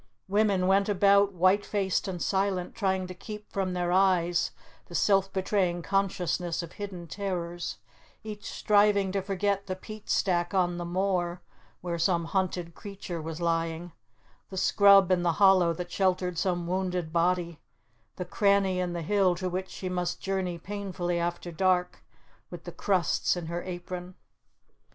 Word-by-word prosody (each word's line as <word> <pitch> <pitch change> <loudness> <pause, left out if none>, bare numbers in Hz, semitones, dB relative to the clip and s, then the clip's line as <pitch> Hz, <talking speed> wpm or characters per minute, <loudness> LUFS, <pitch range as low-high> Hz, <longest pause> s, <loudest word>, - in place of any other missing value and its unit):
Women 200 -2 +2
went 195 +2 +3
about, 200 0 +4
white 185 +3 +3
faced 195 -3 -1
and 185 -2 -4
silent, 190 -1 -1
trying 190 -2 0
to 185 - -7
keep 210 +3 -9
from 190 -2 -1
their 175 -1 -1
eyes 180 -2 +3 0.4
the - - -9
self 195 -1 +3
betraying 185 -3 0
consciousness 180 -3 -1
of 170 - -9
hidden 195 -4 -7
terrors; 175 - -4 0.5
each 210 -1 -7
striving 205 -2 +3
to 195 0 -1
forget 200 +1 -1
the 185 - -2
peat 215 +2 -11
stack 175 -1 +1
on 175 -2 +1
the 175 - -4
moor 180 -1 -1 0.4
where 170 -1 -3
some 170 0 +2
hunted 180 -1 -2
creature 195 -3 -7
was 160 +1 -6
lying, 165 0 -1 0.6
the 190 - -7
scrub 195 0 +6
in 180 -1 +3
the 170 -1 +2
hollow 190 -2 +5
that 175 +1 -5
sheltered 185 -2 0
some 175 0 -1
wounded 180 -2 -2
body, 170 -1 +1 0.6
the 180 - -5
cranny 200 0 +2
in 180 -1 -1
the 170 -1 -4
hill 190 0 +2
to 185 +1 -3
which 185 +1 -3
she 185 - -6
must 180 -1 -2
journey 190 -3 -2
painfully 180 -2 -3
after 175 0 -3
dark 180 +1 0 0.5
with - - -9
the - - -7
crusts 185 -2 +1
in 175 - -4
her 170 +2 -3
apron. 180 0 -7
185 Hz, 155 wpm, -28 LUFS, 175-195 Hz, 0.6 s, scrub